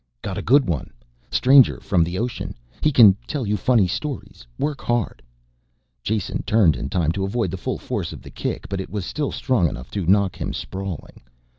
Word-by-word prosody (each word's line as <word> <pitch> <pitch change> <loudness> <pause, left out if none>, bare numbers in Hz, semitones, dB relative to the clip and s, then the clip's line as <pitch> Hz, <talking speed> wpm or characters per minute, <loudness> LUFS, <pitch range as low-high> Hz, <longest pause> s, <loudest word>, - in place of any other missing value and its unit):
"Got - - -3
a - - -3
good 135 +2 +4
one. 75 -6 -2 0.4
Stranger 135 0 +5
from 90 -4 +2
the 85 +2 -3
ocean. 120 +3 -3 0.3
He 155 - +3
can 115 -7 +8
tell 145 -5 -2
you 105 +1 0
funny 110 +1 +3
stories, 125 - -5
work 145 -1 -2
hard." 120 -2 -1 0.8
Jason 105 - -2
turned 100 -9 +3
in 70 - -4
time 80 -2 +1
to 95 +3 -2
avoid 115 +5 -1
the 95 - -4
full - - -2
force - - -4
of - - -10
the - - -11
kick, - - -4
but 95 0 -3
it - - -8
was 100 -3 -4
still 150 +5 -2
strong 115 - +1
enough 65 0 -8
to 100 -5 -3
knock 100 -1 +3
him - - -2
sprawling. 95 -4 -6
100 Hz, 195 wpm, -22 LUFS, 90-125 Hz, 0.8 s, can